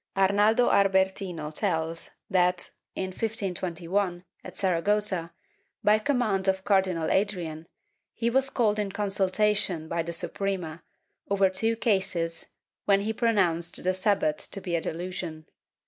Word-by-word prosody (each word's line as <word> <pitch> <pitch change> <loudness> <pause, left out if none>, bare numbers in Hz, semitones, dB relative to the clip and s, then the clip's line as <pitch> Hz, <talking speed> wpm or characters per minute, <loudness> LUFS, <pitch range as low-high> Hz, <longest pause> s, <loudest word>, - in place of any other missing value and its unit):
Arnaldo 205 +5 +4
Albertino 190 -5 +1
tells 160 +2 -2
that, 180 -1 +2 0.2
in 190 - -2
1521, 185 -3 -2 0.2
at - - -10
Saragossa, 190 -1 +1 0.5
by 210 +1 +5
command 215 -7 0
of 190 0 +1
Cardinal 190 -5 +1
Adrian, 175 -6 -1 0.5
he 230 - -1
was 265 +3 +2
called 215 -5 +1
in 205 -2 -1
consultation 195 -3 0
by 170 +1 -1
the 170 +1 -4
Suprema, 170 -1 -3 0.5
over 195 -1 +3
two 225 +4 0
cases, 185 -7 -1 0.4
when 200 -1 +4
he 220 +2 -1
pronounced 180 -8 +2
the 185 +1 +2
Sabbat 185 -5 +1
to 195 - -3
be 180 -3 -3
a 165 - 0
delusion. 170 -2 -5
190 Hz, 125 wpm, -27 LUFS, 170-205 Hz, 0.5 s, by